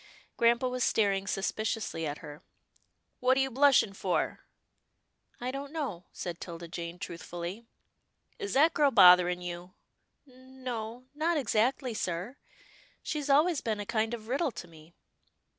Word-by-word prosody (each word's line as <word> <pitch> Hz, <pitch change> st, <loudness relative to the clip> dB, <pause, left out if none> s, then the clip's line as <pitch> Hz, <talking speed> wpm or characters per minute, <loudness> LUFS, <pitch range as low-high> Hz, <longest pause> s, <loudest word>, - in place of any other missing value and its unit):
Grampa 235 Hz, +2 st, +3 dB
was 250 Hz, -1 st, -1 dB
staring 200 Hz, -2 st, +1 dB
suspiciously 205 Hz, -4 st, -2 dB
at 145 Hz, 0 st, -4 dB
her. 150 Hz, 0 st, -10 dB, 0.4 s
" -, -, -46 dB
What 255 Hz, +1 st, +3 dB
are -, -, +3 dB
you 270 Hz, 0 st, +1 dB
blushing 265 Hz, -5 st, +4 dB
for?" 190 Hz, -2 st, -1 dB, 0.5 s
" -, -, -42 dB
I 250 Hz, +1 st, -3 dB
don't 275 Hz, +1 st, -6 dB
know," 265 Hz, -, -4 dB
said 175 Hz, -2 st, -6 dB
'Tilda 170 Hz, -1 st, -7 dB
Jane 170 Hz, 0 st, -6 dB
truthfully. 175 Hz, +3 st, -7 dB, 0.3 s
" -, -, -43 dB
Is 405 Hz, -2 st, -4 dB
that 315 Hz, +4 st, +5 dB
girl 290 Hz, -2 st, +4 dB
bothering 180 Hz, -5 st, +6 dB
you? 175 Hz, +1 st, -7 dB, 0.2 s
" -, -, -49 dB
" -, -, -50 dB
N 260 Hz, 0 st, -17 dB
no, 235 Hz, -1 st, -4 dB
not 320 Hz, +3 st, 0 dB
exactly, 250 Hz, +1 st, +1 dB
sir. 185 Hz, +5 st, -3 dB, 0.7 s
She's 295 Hz, -2 st, -3 dB
always 300 Hz, +2 st, +4 dB
been 215 Hz, -2 st, -2 dB
a 205 Hz, -, -4 dB
kind 225 Hz, +1 st, 0 dB
of 220 Hz, -2 st, -12 dB
riddle 275 Hz, +6 st, 0 dB
to 175 Hz, -, -9 dB
me." 160 Hz, 0 st, -17 dB
225 Hz, 160 wpm, -30 LUFS, 180-265 Hz, 0.7 s, bothering